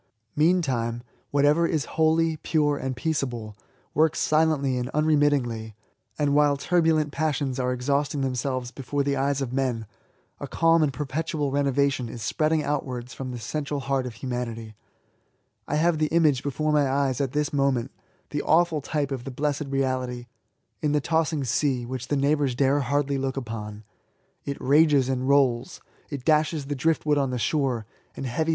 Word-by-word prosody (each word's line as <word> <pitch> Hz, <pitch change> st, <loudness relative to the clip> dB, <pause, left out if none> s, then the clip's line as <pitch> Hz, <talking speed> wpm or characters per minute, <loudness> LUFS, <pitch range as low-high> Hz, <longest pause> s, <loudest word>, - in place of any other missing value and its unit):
Meantime, 135 Hz, -8 st, +1 dB, 0.3 s
whatever 145 Hz, +4 st, +3 dB
is 155 Hz, -4 st, -1 dB
holy, 160 Hz, 0 st, +2 dB
pure, 150 Hz, -1 st, +1 dB
and 130 Hz, -2 st, -3 dB
peaceable, 125 Hz, -8 st, -2 dB, 0.4 s
works 155 Hz, +1 st, +3 dB
silently 155 Hz, -4 st, +2 dB
and 125 Hz, 0 st, -2 dB
unremittingly; 145 Hz, -8 st, +1 dB, 0.4 s
and 145 Hz, -2 st, +1 dB
while 145 Hz, -1 st, +4 dB
turbulent 160 Hz, -2 st, +2 dB
passions 140 Hz, -3 st, -1 dB
are 125 Hz, 0 st, 0 dB
exhausting 140 Hz, +3 st, 0 dB
them 135 Hz, -1 st, 0 dB
selves 125 Hz, -1 st, -2 dB
before 140 Hz, +2 st, -2 dB
the 140 Hz, 0 st, 0 dB
eyes 140 Hz, +1 st, 0 dB
of 125 Hz, -2 st, -5 dB
men, 130 Hz, -4 st, -1 dB, 0.5 s
a -, -, -5 dB
calm 165 Hz, 0 st, +3 dB
and 150 Hz, -2 st, +2 dB
perpetual 150 Hz, +1 st, -2 dB
renovation 140 Hz, -3 st, +1 dB
is 115 Hz, -1 st, -7 dB
spreading 155 Hz, 0 st, +1 dB
outwards 130 Hz, -4 st, -3 dB
from 130 Hz, -1 st, -6 dB
the 125 Hz, -, -5 dB
central 145 Hz, +4 st, -3 dB
heart 135 Hz, -1 st, -1 dB
of 120 Hz, -, -8 dB
humanity, 115 Hz, -4 st, -5 dB, 0.9 s
I -, -, -1 dB
have 160 Hz, +1 st, +2 dB
the 155 Hz, -, +2 dB
image 155 Hz, -5 st, +3 dB
before 150 Hz, +2 st, -1 dB
my 145 Hz, -2 st, +3 dB
eyes 135 Hz, -1 st, 0 dB
at 135 Hz, -2 st, -2 dB
this 150 Hz, 0 st, -1 dB
moment 135 Hz, -4 st, +1 dB, 0.2 s
— -, -, -39 dB
the 145 Hz, -, -1 dB
awful 165 Hz, -1 st, +2 dB
type 145 Hz, 0 st, -2 dB
of 130 Hz, -3 st, -3 dB
the 135 Hz, -, -6 dB
blessed 145 Hz, +2 st, -2 dB
reality 130 Hz, -2 st, -1 dB, 0.3 s
— -, -, -48 dB
in 150 Hz, -1 st, +1 dB
the 150 Hz, -, +3 dB
tossing 160 Hz, -1 st, 0 dB
sea, 130 Hz, 0 st, 0 dB
which 130 Hz, 0 st, -5 dB
the 145 Hz, -, 0 dB
neighbours 140 Hz, -2 st, +1 dB
dare 140 Hz, +2 st, +3 dB
hardly 140 Hz, +1 st, 0 dB
look 135 Hz, 0 st, -2 dB
upon. 110 Hz, -4 st, -6 dB, 0.6 s
It 140 Hz, -, -4 dB
rages 145 Hz, -1 st, +4 dB
and 130 Hz, 0 st, -1 dB
rolls, 135 Hz, +1 st, +2 dB, 0.3 s
it 140 Hz, -4 st, -6 dB
dashes 155 Hz, -1 st, +2 dB
the 145 Hz, +1 st, -3 dB
drift 160 Hz, +4 st, 0 dB
wood 150 Hz, -1 st, +3 dB
on 135 Hz, -2 st, 0 dB
the 125 Hz, -, -2 dB
shore, 125 Hz, -3 st, 0 dB, 0.3 s
and -, -, -4 dB
heavy -, -, -2 dB
102 -, -, -6 dB
ESSAYS. 160 Hz, +6 st, -1 dB
140 Hz, 175 wpm, -25 LUFS, 130-150 Hz, 0.9 s, while